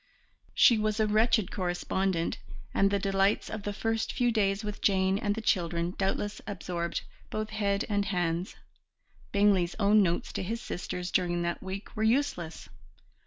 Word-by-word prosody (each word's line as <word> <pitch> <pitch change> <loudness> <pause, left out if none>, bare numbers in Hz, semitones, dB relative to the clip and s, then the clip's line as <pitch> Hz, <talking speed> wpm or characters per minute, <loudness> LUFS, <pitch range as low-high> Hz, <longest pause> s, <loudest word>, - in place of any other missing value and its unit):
She 235 -3 +6
was 215 0 0
a 220 - +4
wretched 215 -1 +2
correspondent, 180 -1 -1 0.3
and 195 - +3
the 200 - +1
delights 195 +1 +1
of 220 - -4
the 205 - -3
first 225 +2 -1
few 245 -2 +2
days 200 -2 +1
with 210 -1 -5
Jane 190 0 +2
and 205 -3 0
the 225 - -5
children 170 -3 0
doubtless 205 +2 -2
absorbed 175 -4 -3 0.3
both 215 0 -3
head 200 -1 0
and 205 -1 0
hands. 175 -1 -1 0.8
Bingley's 200 -4 +3
own 210 +1 +5
notes 175 -3 0
to - - -2
his 225 +5 -3
sisters 180 -3 -5
during 175 -1 +1
that 170 0 -2
week 190 +4 -7
were 215 - -3
useless. 220 - 0
200 Hz, 160 wpm, -29 LUFS, 180-215 Hz, 0.8 s, She